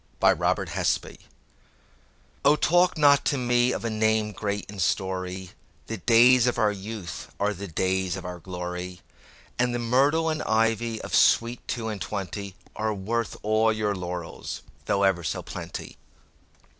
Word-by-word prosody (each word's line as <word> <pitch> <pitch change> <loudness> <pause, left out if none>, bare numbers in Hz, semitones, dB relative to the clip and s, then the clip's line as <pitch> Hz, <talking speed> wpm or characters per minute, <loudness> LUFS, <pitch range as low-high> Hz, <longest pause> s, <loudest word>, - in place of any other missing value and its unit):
All - - +5
for - - -8 0.3
Love - - +1 1.4
O 145 +2 +6
TALK 175 +3 +3
not 145 -2 +5
to 140 - +1
me 120 0 +2
of - - -3
a - - 0
name 110 0 +1
great 100 0 -3
in 100 -1 -9
story; 95 0 -2 0.3
The 115 - -5
days 120 +4 +5
of 125 - 0
our 105 -1 +3
youth 100 -2 -7
are 105 +1 +1
the 100 +1 -7
days 95 +1 0
of 95 - -7
our 90 0 -6
glory; 90 0 -6 0.6
And 125 0 +2
the - - +1
myrtle 135 +7 +2
and 155 0 -1
ivy 115 0 +1
of - - -7
sweet 115 +1 +3
two 115 -2 -3
and 105 -3 -5
twentyAre 100 +2 -4
worth 115 +4 -2
all 110 +1 +3
your 110 -2 0
laurels, 90 -2 -6 0.2
though 100 - +2
ever 95 -3 +2
so 80 - -3
plenty. - - -7
105 Hz, 155 wpm, -26 LUFS, 95-120 Hz, 1.4 s, O